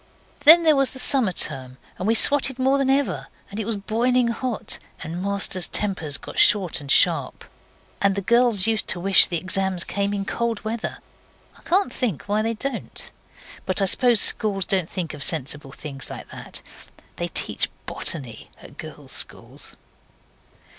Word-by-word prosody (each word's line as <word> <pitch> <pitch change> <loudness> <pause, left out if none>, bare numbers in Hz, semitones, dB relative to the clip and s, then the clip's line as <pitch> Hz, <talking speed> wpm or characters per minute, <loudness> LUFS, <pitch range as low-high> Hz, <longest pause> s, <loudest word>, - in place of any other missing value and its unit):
Then 335 +3 +9
there 315 -2 +4
was 275 -1 +4
the - - -10
summer 255 -5 +5
term, 130 -6 -1 0.2
and 185 - -3
we 225 - +2
swotted 270 0 +4
more 265 +2 +1
than 270 -1 0
ever; 195 - -1 0.2
and 200 - -7
it 220 - -4
was 225 -2 -2
boiling 235 +4 0
hot, 240 -1 -5 0.2
and 170 +2 -6
masters' 195 -2 -2
tempers 180 -8 -2
got - - -7
short 190 -7 +3
and 140 - -11
sharp, - - +2 0.6
and 200 -1 +2
the 200 - -2
girls 235 -2 +4
used 220 -1 0
to 175 - 0
wish 195 +2 +6
the 175 - -2
exams 185 +1 +1
came 200 0 -3
in 200 -1 -3
cold 235 0 -3
weather. 225 +1 -4 0.6
I - - -20
can't 385 +3 0
think 195 - -3
why 210 +6 -1
they 225 +1 -2
don't. 270 +5 -6 0.6
But 185 +1 +1
I 195 - +2
suppose 240 +4 +3
schools 195 -3 +2
don't 185 -4 0
think 175 -4 -5
of - - -10
sensible 145 -2 -1
thinks 140 -1 -7
like - - -10
that. - - -6 0.5
They - - -3
teach - - -3 0.2
botany 130 -9 -4
at - - -16
girls' - - -9
schools. - - -5
200 Hz, 170 wpm, -22 LUFS, 175-240 Hz, 0.6 s, Then